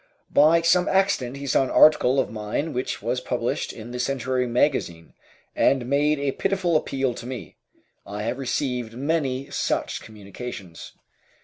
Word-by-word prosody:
By 165 Hz, +3 st, +5 dB
some 180 Hz, +2 st, +4 dB
accident 190 Hz, -10 st, +1 dB
he 140 Hz, -, -7 dB
saw 135 Hz, -, +3 dB
an 130 Hz, -, -3 dB
article 140 Hz, -3 st, +5 dB
of 130 Hz, -, -1 dB
mine 110 Hz, +8 st, -3 dB
which 125 Hz, -, -3 dB
was -, -, -1 dB
published -, -, -2 dB
in 115 Hz, +2 st, -9 dB
the 125 Hz, -, -5 dB
"Century 130 Hz, 0 st, -1 dB
Magazine," 120 Hz, -, 0 dB, 0.4 s
and 130 Hz, -3 st, +2 dB
made 145 Hz, +3 st, +2 dB
a 140 Hz, -1 st, -1 dB
pitiful 185 Hz, 0 st, 0 dB
appeal 135 Hz, -4 st, 0 dB
to 120 Hz, -, -8 dB
me. 130 Hz, -1 st, -7 dB, 0.5 s
I 105 Hz, +1 st, -6 dB
have 120 Hz, +4 st, -2 dB
received 125 Hz, -3 st, -2 dB
many 140 Hz, -2 st, -1 dB
such -, -, -1 dB
communications. 100 Hz, -3 st, -9 dB
130 Hz, 150 wpm, -24 LUFS, 120-145 Hz, 0.5 s, By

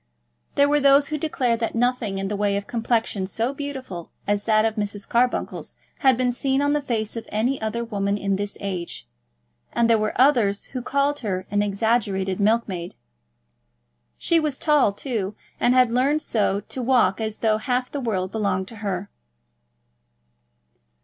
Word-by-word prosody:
There 280 Hz, -, +5 dB
were 295 Hz, +1 st, +3 dB
those 280 Hz, 0 st, +5 dB
who 305 Hz, -, -1 dB
declared 255 Hz, -6 st, 0 dB
that 230 Hz, -1 st, -2 dB
nothing 240 Hz, -4 st, 0 dB
in 195 Hz, 0 st, -2 dB
the 210 Hz, -, -2 dB
way 200 Hz, 0 st, +1 dB
of 200 Hz, -, -4 dB
complexion 225 Hz, -4 st, -1 dB
so 230 Hz, +7 st, -1 dB
beautiful 265 Hz, -, -6 dB, 0.2 s
as 205 Hz, 0 st, 0 dB
that 215 Hz, -1 st, +4 dB
of 225 Hz, -, +1 dB
Mrs. 205 Hz, -2 st, -4 dB
Carbuncle's 245 Hz, +1 st, 0 dB, 0.2 s
had 265 Hz, -3 st, +4 dB
been 250 Hz, -1 st, +1 dB
seen 265 Hz, +2 st, 0 dB
on 285 Hz, 0 st, +2 dB
the 295 Hz, -, +1 dB
face 225 Hz, -5 st, -2 dB
of 230 Hz, -1 st, -6 dB
any 240 Hz, +6 st, 0 dB
other 220 Hz, +2 st, -2 dB
woman 200 Hz, -3 st, -1 dB
in 200 Hz, -1 st, 0 dB
this 200 Hz, +1 st, -4 dB
age, 175 Hz, -, -5 dB, 0.6 s
and 235 Hz, -1 st, +2 dB
there 230 Hz, -1 st, +4 dB
were 215 Hz, +2 st, -2 dB
others 235 Hz, -7 st, +3 dB
who 255 Hz, -, -5 dB
called 280 Hz, +3 st, 0 dB
her 190 Hz, -5 st, -3 dB
an 205 Hz, 0 st, +2 dB
exaggerated 200 Hz, -2 st, 0 dB
milkmaid. 200 Hz, -5 st, 0 dB, 1.2 s
She 335 Hz, -, +2 dB
was 300 Hz, -4 st, -1 dB
tall, 300 Hz, -9 st, +3 dB
too, 210 Hz, -2 st, -3 dB, 0.2 s
and 245 Hz, +1 st, +3 dB
had 250 Hz, -2 st, +5 dB
learned 275 Hz, +5 st, +2 dB
so 205 Hz, -2 st, 0 dB
to 255 Hz, -, -6 dB
walk 245 Hz, -4 st, +3 dB
as 220 Hz, -1 st, -3 dB
though 220 Hz, -2 st, +2 dB
half 250 Hz, +2 st, -1 dB
the 285 Hz, -, -3 dB
world 190 Hz, -6 st, -1 dB
belonged 200 Hz, -3 st, -1 dB
to 230 Hz, -, -11 dB
her. 200 Hz, -2 st, -4 dB
225 Hz, 170 wpm, -23 LUFS, 200-255 Hz, 1.2 s, There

